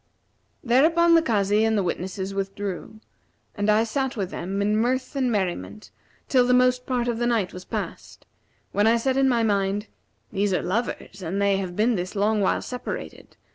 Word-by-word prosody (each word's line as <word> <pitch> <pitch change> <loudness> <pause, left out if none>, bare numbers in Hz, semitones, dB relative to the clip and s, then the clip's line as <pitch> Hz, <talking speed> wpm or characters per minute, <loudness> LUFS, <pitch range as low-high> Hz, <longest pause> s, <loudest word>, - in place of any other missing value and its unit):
Thereupon 325 +8 +4
the 330 - +6
Kazi 210 -6 +2
and 220 -1 +2
the 200 - +1
witnesses 190 +2 -3
withdrew, 195 +1 -5 0.5
and 205 0 -1
I 215 +1 +4
sat 265 +2 -2
with 190 -3 -3
them, 195 +3 -4
in 205 +1 +1
mirth 255 +4 0
and 260 -3 +1
merriment, 200 +1 -3 0.4
till 250 -2 +3
the 250 - +4
most 250 0 +2
part 245 -2 0
of 235 -1 -1
the 240 - +1
night 225 -6 0
was 180 0 -9
past, - - -6 0.5
when 205 +2 +2
I 230 +1 +5
said 260 +3 0
in 270 0 +3
my 235 -2 +2
mind, 200 0 0 0.4
'These 200 -1 +1
are - - -1
lovers 200 0 -3
and 185 +3 -3
they 200 -1 +2
have 185 -2 -4
been 225 +5 +2
this 185 0 -3
long 210 +1 +1
while 190 - +1
separated. 250 -1 -7
215 Hz, 185 wpm, -24 LUFS, 195-245 Hz, 0.5 s, the